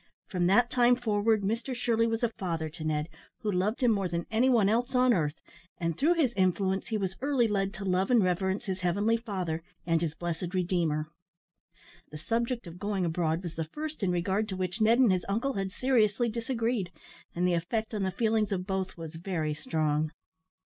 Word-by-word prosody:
From 180 -2 0
that 235 +6 +4
time 245 0 +5
forward 215 -3 +1
Mr 230 +6 -2
Shirley 230 -1 +1
was 225 +1 -1
a 235 - +3
father 165 -7 -3
to 155 +1 -9
Ned, 155 -1 -1 0.3
who 215 - 0
loved 200 +6 0
him 245 - +5
more 200 -3 +1
than 170 -1 -3
any 235 +4 +3
one 230 -6 +4
else 240 +5 +1
on 250 0 +5
earth, 155 -5 -1 0.4
and 165 -2 -1
through 320 - +3
his 280 -8 +2
influence 190 0 +1
he 220 - -1
was 190 -2 -2
early 270 -4 +2
led 195 -2 0
to 195 - -6
love 185 0 +1
and 240 -4 +5
reverence 190 +4 0
his 190 -2 -3
heavenly 200 +6 +2
Father 185 -8 -3 0.2
and 165 -1 +2
his 160 -2 -2
blessed 175 +2 -4
Redeemer. 165 -4 0 1.0
The 150 - -8
subject 235 +8 -1
of 170 +1 -10
going 200 -3 -1
abroad 165 0 0
was 170 -2 -5
the 160 - -1
first 305 - -6
in 195 - +1
regard 190 +5 0
to 190 - -3
which 185 +3 -3
Ned 225 +2 +5
and 250 -5 +5
his 185 -1 +1
uncle 235 +7 0
had 195 -1 -2
seriously 235 -2 +2
disagreed, 230 -4 -1 0.4
and 180 +1 +1
the 180 - +2
effect 215 +7 -2
on 210 - -2
the 190 - +1
feelings 220 0 +1
of 185 -2 -1
both 190 -1 -3
was 165 -1 -7
very 165 -3 -2
strong. 155 0 -1
195 Hz, 200 wpm, -29 LUFS, 175-230 Hz, 1.0 s, time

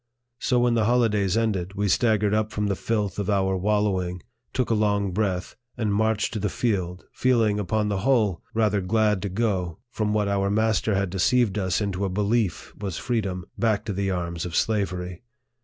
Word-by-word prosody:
So, 125 - +1
when 120 0 +3
the 115 -2 +2
holidays 110 -5 +2
ended, 100 -5 -1
we 100 0 0
staggered 105 -1 +2
up 110 0 +1
from 105 - -1
the 100 -1 0
filth 105 -1 -2
of 100 - -2
our 95 -1 +2
wallowing, 95 -2 0 0.3
took 125 -3 -1
a - - +4
long 105 -2 +1
breath, 95 -2 -1 0.2
and 110 -3 0
inarched 110 +1 +1
to 110 - -2
the 105 0 -1
field, 95 -7 -2
feeling, 115 -5 +2
upon 105 +1 0
the 100 -2 -1
whole, 110 -6 +2
rather 105 -3 +2
glad 105 0 +1
to 100 - -2
go, 95 -5 -1
from 105 -2 -1
what 105 -1 +1
our 100 0 +1
master 110 0 +1
had 95 -2 0
deceived 105 +2 +2
us 95 0 0
into 100 -1 -2
a 100 - 0
belief 105 +1 0
was 100 -4 -4
freedom, 95 -7 -2
back 110 -3 +1
to 105 - -2
the 100 +1 -1
arms 85 -2 -2
of 85 -2 -5
slavery. 90 -5 -1
105 Hz, 190 wpm, -25 LUFS, 95-110 Hz, 0.3 s, a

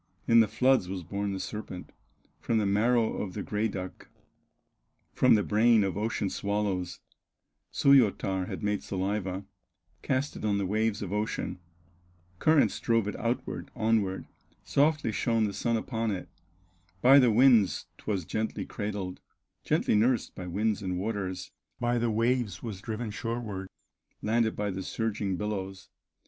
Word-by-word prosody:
"In 115 0 +6
the 110 - +5
floods 125 -5 +2
was 95 -2 -4
born 100 +4 -3
the 95 - -3
serpent, 95 -1 -6 0.5
From 115 - 0
the 105 - +2
marrow 110 +3 +2
of 95 -3 -5
the 105 - -3
gray 105 +1 0
duck, 95 -3 -7 1.1
From 130 -3 +5
the 105 - +2
brain 110 +1 +4
of 95 -2 -1
ocean 105 0 -1
swallows; 100 -3 -2 0.7
Suoyatar 100 -8 +3
had - - -6
made 105 -1 0
saliva, 95 0 -3 0.6
Cast 135 +2 -1
it - - -8
on 105 -2 +1
the 100 - -1
waves 105 +1 0
of 100 0 -5
ocean, 105 -3 -2 0.8
Currents 155 -2 +3
drove 115 -3 +1
it 105 - -3
outward, 120 +2 -3
onward, 110 -4 +1 0.4
Softly 145 -4 +2
shone 115 0 +1
the 105 -2 -1
sun 115 +3 0
upon 115 0 -2
it, 95 -3 -3 0.8
By 135 +3 +8
the 125 -3 +5
winds 115 -3 +4
'twas 100 -6 -2
gently 110 +5 -2
cradled, 100 -4 -4 0.4
Gently - - +1
nursed 115 +3 +2
by 90 - -7
winds 105 +4 0
and 90 -2 -2
waters, 95 -2 -3 0.3
By 120 0 +1
the 120 0 +1
waves 115 0 0
was 105 -6 -6
driven 110 0 -4
shoreward, 105 -4 -4 0.5
Landed 110 +1 +1
by 105 -1 -1
the 95 0 -4
surging 100 -2 -2
billows. 95 -2 -4
105 Hz, 150 wpm, -29 LUFS, 95-115 Hz, 1.1 s, By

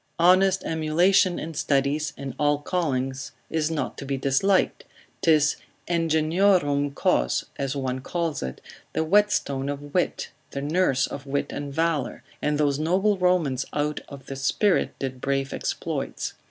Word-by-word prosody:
Honest 185 +2 +4
emulation 175 +4 +3
in 165 +1 -5
studies, 145 +1 0
in 135 -2 -5
all 145 0 +3
callings 135 -6 -2 0.2
is 160 -1 0
not 155 -4 -3
to - - -5
be 135 0 -1
disliked, 140 +9 +2 0.4
'tis 155 -4 +4 0.3
ingeniorum 160 -3 +2
cos, - - +1
as 135 0 -1
one 130 -2 -2
calls 165 +1 -2
it, 65 -1 -5 0.3
the - - +1
whetstone 155 -7 +2
of 145 0 -6
wit, 180 - -1 0.2
the 140 - -5
nurse 150 -4 +2
of 140 0 -8
wit 140 +1 -1
and 145 -1 -5
valour, 160 -5 -1 0.2
and 150 0 +1
those 145 -1 +1
noble 190 +6 +2
Romans 170 -8 +2
out 150 0 -1
of 140 -2 -10
this 135 0 -6
spirit 200 +8 +2
did 130 -2 -5
brave 135 0 -1
exploits. - - -3
150 Hz, 145 wpm, -25 LUFS, 140-170 Hz, 0.4 s, Honest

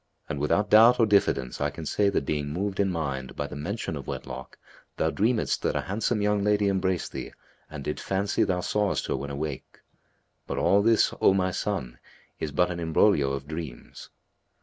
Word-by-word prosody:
and 70 - -4
without 100 +8 +1
doubt 115 +3 +7
or 115 - +6
diffidence 100 - +1
I 75 - +1
can 80 +3 -8
say 100 +6 +2
that 95 - -1
being 75 0 -1
moved 95 +6 -3
in 100 -1 +3
mind 70 -7 -3
by - - -3
the - - -8
mention 85 +3 -4
of 70 - -7
wedlock 65 0 -7 0.4
thou 80 - +1
dreamedst 110 +5 +1
that - - 0
a - - +1
handsome 105 +2 -1
young 105 -1 +1
lady 105 -1 +2
embraced 95 -2 -1
thee - - -6 0.4
and 75 -3 -7
didst 75 - -4
fancy 100 +1 0
thou 90 -1 0
sawest 105 +2 0
her - - -1
when 70 - -5
awake. 70 -1 -6 0.7
But - - -3
all 100 +1 +4
this, 115 +1 +3
O 95 - +5
my 95 -1 +1
son, 70 -11 -3 0.4
is 75 - -3
but 90 +4 +2
an 85 - -4
imbroglio 80 -3 +3
of 70 0 -4
dreams." 80 -5 -8
90 Hz, 195 wpm, -27 LUFS, 75-100 Hz, 0.7 s, doubt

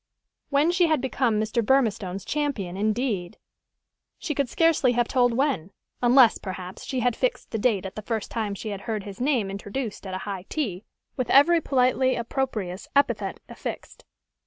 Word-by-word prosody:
When 290 +4 +3
she 350 -1 +3
had 310 -3 +2
become 250 -4 0
Mr. 220 +2 0
Burmistone's 205 -6 +1
champion, 275 -12 -2
indeed! 210 -3 -1 0.8
She 305 - -3
could 280 -3 -1
scarcely 320 -6 +3
have 240 0 +1
told 245 -2 +3
when, 245 - 0 0.3
unless, 245 -1 +6
perhaps, 185 -1 -7
she 260 -2 -2
had 245 -1 +1
fixed - - -2
the 225 - -2
date 205 -4 +1
at 190 - -5
the 215 - -6
first 220 0 -3
time 215 -3 -2
she 215 - -6
had 200 -1 -5
heard 215 -2 -2
his 200 +2 -9
name 250 -8 +1
introduced 205 +2 -5
at 185 - -4
a 185 - -5
high 195 -2 -5
tea, 215 - -3 0.3
with 255 -3 -2
every 330 +5 +6
politely 260 -1 +2
opprobrious 230 -6 -3
epithet 280 0 +1
affixed. - - -7
235 Hz, 170 wpm, -25 LUFS, 200-270 Hz, 0.8 s, unless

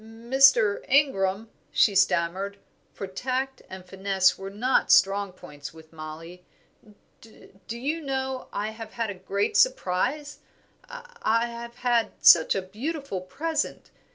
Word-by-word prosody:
"Mr. 230 -1 +3
Ingram," 225 -6 +1 0.2
she 210 - +3
stammered 195 +1 +1 0.3
for - - -7
tact 260 +7 -3
and 190 -1 -10
finesse 190 0 +1
were 195 0 -8
not 240 +6 +1
strong 195 0 +4
points 150 -3 -11
with 160 0 -16
Mollie, 165 +3 -10 1.2
"do 230 - -5
you 295 +7 -3
know 265 -2 -3
I 210 +1 -3
have 220 0 -10
had 230 -3 -2
a - - -6
great 195 - -2
surprise. 290 - +1 0.5
I 475 - -2
have 235 0 -8
had 240 -2 0
such 160 -2 +6
a 195 - -2
beautiful 240 - -5
present. 310 - -4
220 Hz, 125 wpm, -26 LUFS, 190-265 Hz, 1.2 s, such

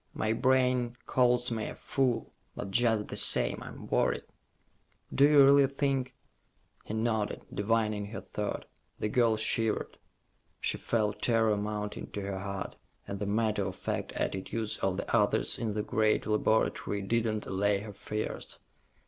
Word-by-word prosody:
"My 110 0 0
brain 125 -1 +2
calls 125 -1 +2
me 110 -2 -2
a - - -6
fool, 130 -3 -1 0.2
but 100 - -5
just 110 -1 +2
the - - -5
same, - - +3
I'm - - -9
worried." - - +1 0.9
"Do 140 +1 +6
you 145 -2 +8
really 140 0 +6
think 135 -1 -1 0.4
...?" - - -37
He 110 - -4
nodded, 110 -2 -1
divining 105 0 0
her 110 - -6
thought. 105 -1 -4 0.3
The 105 - -2
girl 115 -1 +3
shivered. 110 0 0 0.6
She - - -1
felt 110 -3 -1
terror 115 -2 +3
mounting 105 0 -4
to 100 - -3
her 100 -1 -3
heart, 100 0 -5 0.3
and 100 - -5
the 100 - -2
matter 110 +1 +1
of - - -4
fact - - -3
attitudes 105 +3 -2
of 95 -1 0
the - - -1
others - - +2
in 110 -3 -2
the 105 - -1
great 110 0 +1
laboratory 105 -1 +1
did 115 +4 +1
not 110 -1 -2
allay 100 +1 +1
her 105 -1 -8
fears. 105 +2 -5
110 Hz, 155 wpm, -30 LUFS, 105-120 Hz, 0.9 s, you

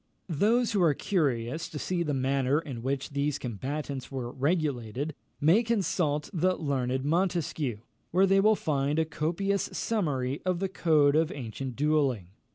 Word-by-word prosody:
Those 220 +9 +2
who 205 -4 +1
are 160 -5 +4
curious 145 - -1
to 150 - -7
see 175 +4 -1
the 155 -3 0
manner 135 +1 +1
in 135 -8 -6
which 135 +3 -2
these 140 0 0
combats 135 +4 -5
were 125 -3 -4
regulated, 140 -2 -1 0.3
may 165 +10 +5
consult 180 -10 0
the 185 +1 +2
learned 130 -4 -1
Montesquieu, 160 - 0 0.3
where 185 +3 +4
they 195 0 +4
will 215 +2 +5
find 145 -4 0
a 160 - +3
copious 175 +6 -1
summary 145 - -1
of 185 -1 0
the 195 +2 -2
code 150 -6 +3
of 160 0 +2
ancient 125 0 -5
duelling. 140 - +1
150 Hz, 155 wpm, -28 LUFS, 135-175 Hz, 0.3 s, may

